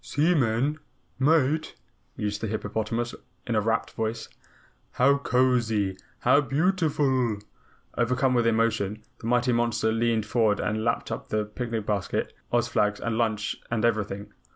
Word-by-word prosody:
"Seaman? 145 -3 +1 0.4
Mate?" 155 +2 +2 0.4
mused 105 0 -2
the 110 - -1
hippopotamus 110 +2 -2 0.3
in 120 - -2
a 110 - +3
rapt 115 +2 0
voice. 110 +1 -3 0.6
"How 140 +3 +4
cozy, 120 -7 +1 0.3
how 145 - +5
beautiful!" 145 - +1 0.6
Overcome 125 +2 +2
with 120 -2 +3
emotion, 110 -2 +1 0.2
the 115 - -6
mighty 125 +1 +2
monster 115 -1 +1
leaned 115 -1 +1
forward 110 -3 +2
and 110 +1 -1
lapped 115 0 -1
up - - -5
the 105 0 0
picnic 115 0 -4
basket, 100 -2 -1 0.2
Oz 120 -1 +2
flags, 105 -2 +1
lunch 110 -2 -1
and 115 -1 0
everything. 105 -2 -1
115 Hz, 130 wpm, -26 LUFS, 110-125 Hz, 0.6 s, how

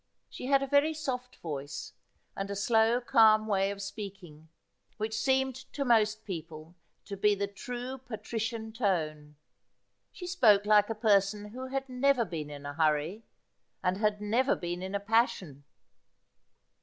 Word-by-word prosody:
She 250 - -7
had 275 0 +3
a - - -2
very 285 +3 +3
soft 255 -4 -4
voice, 145 -3 -6 0.4
and 195 0 -4
a 200 - -3
slow 225 +3 +3
calm 220 -3 +5
way 195 -2 +1
of 200 0 -5
speaking, 195 -6 -9 0.5
which 220 +1 -3
seemed 265 +2 +1 0.2
to 280 - -2
most 220 -3 +2
people 165 -3 -7 0.3
to 200 - -6
be 205 +1 +3
the 200 0 -1
true 245 +5 -6
patrician 225 -1 -5
tone. 155 -9 -1 0.8
She 360 - -9
spoke 225 - +4
like 210 0 +5
a 225 - -2
person 210 -1 +2
who 255 +4 -7
had 270 +1 -3
never 255 -1 +2
been 155 -6 -5
in 145 -1 -9
a 145 - -5
hurry, 160 +7 0 0.6
and 185 0 +1
had 210 0 +1
never 240 +7 +2
been 175 0 -4
in 190 +2 -4
a - - +1
passion. 200 - 0
210 Hz, 155 wpm, -30 LUFS, 190-245 Hz, 0.8 s, calm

